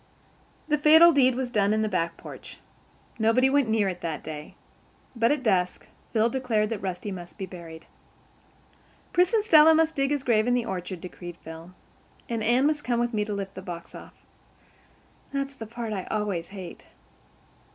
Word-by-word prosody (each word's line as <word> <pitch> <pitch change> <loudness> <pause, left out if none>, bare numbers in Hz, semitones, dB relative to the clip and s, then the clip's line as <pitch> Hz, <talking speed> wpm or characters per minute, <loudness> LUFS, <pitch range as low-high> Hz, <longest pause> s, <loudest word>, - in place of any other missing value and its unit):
The 300 -1 +1
fatal 320 +3 +8
deed 260 -4 +4
was 255 -1 -3
done 210 -2 +2
in 220 - +1
the - - 0
back 170 -4 -1
porch. - - -11 0.6
Nobody 240 +4 +3
went 280 -4 +2
near 220 -2 +2
it 180 -2 -4
that 160 -3 -4
day. 150 -1 -8 0.6
But 230 +1 +2
at 290 -3 0
dusk 185 -5 0 0.3
Phil 225 0 +3
declared 235 -4 0
that 225 -3 -3
Rusty 190 +2 -4
must 175 -2 -9
be 195 - -4
buried. 170 -3 -11 1.3
"Pris 360 +2 +4
and 445 -3 +2
Stella 320 -5 +7
must 320 0 +2
dig 275 -2 +1
his 290 -2 -1
grave 225 -3 +2
in 245 - +3
the 245 -2 0
orchard," 180 -1 -5
declared 175 -1 -9
Phil, 165 +3 -11 0.5
"and 230 -2 -2
Anne 240 +5 +3
must 300 0 +1
come 240 -1 0
with 240 0 -1
me 210 -1 +1
to 210 - -4
lift 195 -1 -5
the 190 - -8
box 175 -3 -8
off. - - -12 1.2
That's 275 0 -3
the 225 -5 -9
part 230 -1 -5
I 190 -3 -4
always 205 -6 -2
hate." 190 -3 -10
220 Hz, 185 wpm, -26 LUFS, 185-265 Hz, 1.3 s, fatal